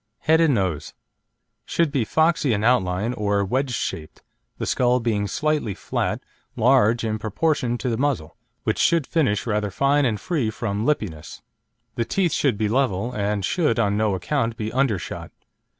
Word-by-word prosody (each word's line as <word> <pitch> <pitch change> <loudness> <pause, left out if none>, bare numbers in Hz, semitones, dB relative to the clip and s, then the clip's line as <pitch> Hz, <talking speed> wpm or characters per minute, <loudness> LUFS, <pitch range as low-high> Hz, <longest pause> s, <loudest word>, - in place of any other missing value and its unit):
HEAD 160 +1 +4
AND 155 -5 +4
NOSE 85 -7 -2 0.7
Should 170 -3 0
be 135 -5 +1
foxy 160 0 +2
in 105 0 -1
outline 105 -1 +1
or 100 -3 0
wedge 130 +7 0
shaped, 80 -5 -5 0.3
the - - -3
skull 125 0 +2
being 110 -4 0
slightly 150 -6 -1
flat, - - -2 0.3
large 120 -1 +3
in 110 -1 -1
proportion 120 +3 0
to 125 - -4
the 115 -1 -1
muzzle, 135 - -1 0.3
which - - -1
should 165 -4 +3
finish 130 - 0
rather 105 -2 0
fine 140 +8 +2
and 110 -4 0
free 150 -11 -1
from 105 +1 -3
lippiness. 105 - -3 0.5
The 115 +1 -1
teeth 180 +2 0
should 130 -8 +1
be 110 0 0
level, 120 -1 0
and 105 -2 -1
should 155 - +1
on 100 -3 +2
no 105 -2 +1
account 115 +4 -1
be 110 0 -4
undershot. 125 - -1
115 Hz, 165 wpm, -23 LUFS, 105-140 Hz, 0.7 s, HEAD